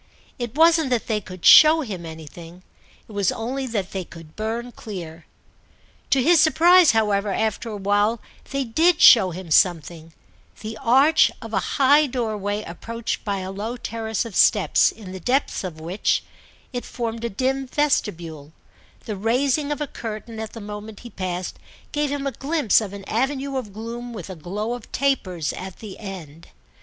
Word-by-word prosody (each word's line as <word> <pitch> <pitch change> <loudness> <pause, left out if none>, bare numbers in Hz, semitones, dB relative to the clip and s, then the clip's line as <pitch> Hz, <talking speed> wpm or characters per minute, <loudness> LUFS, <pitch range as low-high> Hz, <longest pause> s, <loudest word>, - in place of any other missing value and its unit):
It 240 0 -5
wasn't 325 -2 +4
that 245 -3 0
they 215 -2 -1
could 185 -2 -10
show 310 +1 +8
him 190 - -6
anything, 165 +2 -11 0.4
it - - -14
was 200 -3 +1
only 260 +4 -4
that 205 -6 -3
they 190 -1 -3
could 165 -2 -14
burn 230 +3 -4
clear. 170 -8 -9 0.8
To 265 -2 +3
his 340 +3 +5
surprise, 340 +1 +6
however, 210 -2 +2
after 220 +3 -1
a 210 - -5
while, 205 +3 +1 0.3
they 275 -1 -1
did 320 +8 +2
show 205 -6 +8
him 175 -1 -8
something: 165 -2 +2 0.5
the 220 +1 -6
arch 275 +7 +5
of 225 -2 -10
a 195 - +2 0.2
high 285 +2 +5
doorway 215 -5 -2
approached 230 +7 -5
by 200 -3 -2
a 185 +1 -5
low 215 +5 -5
terrace 225 -2 -3
of 230 - -8
steps, - - +4
in 200 -5 -11
the 190 - -7
depth 255 - 0
of 170 -4 -6
which—it 190 - -4
formed 230 -1 -5
a 235 - -1
dim 265 +5 -1
vestibule—the 175 - -4
raising 260 +8 0
of 295 - -3
a - - 0
curtain 225 -3 -7
at 220 -1 -6
the 230 - -8
moment 210 +1 -8
he 240 - -11
passed 185 -2 -4 0.3
gave 295 -1 0
him 285 -1 -3
a 275 - -1
glimpse 280 - +2
of 205 -3 -5
an 200 -1 -9
avenue 270 +4 -1
of 245 -6 -4
gloom 235 +3 -7
with 195 -3 -7
a - - -7
glow 205 +8 -4
of 245 -2 -9
tapers 185 - -1
at 190 0 -8
the 205 -4 -10
end. 170 -6 -9
220 Hz, 170 wpm, -23 LUFS, 190-260 Hz, 0.8 s, show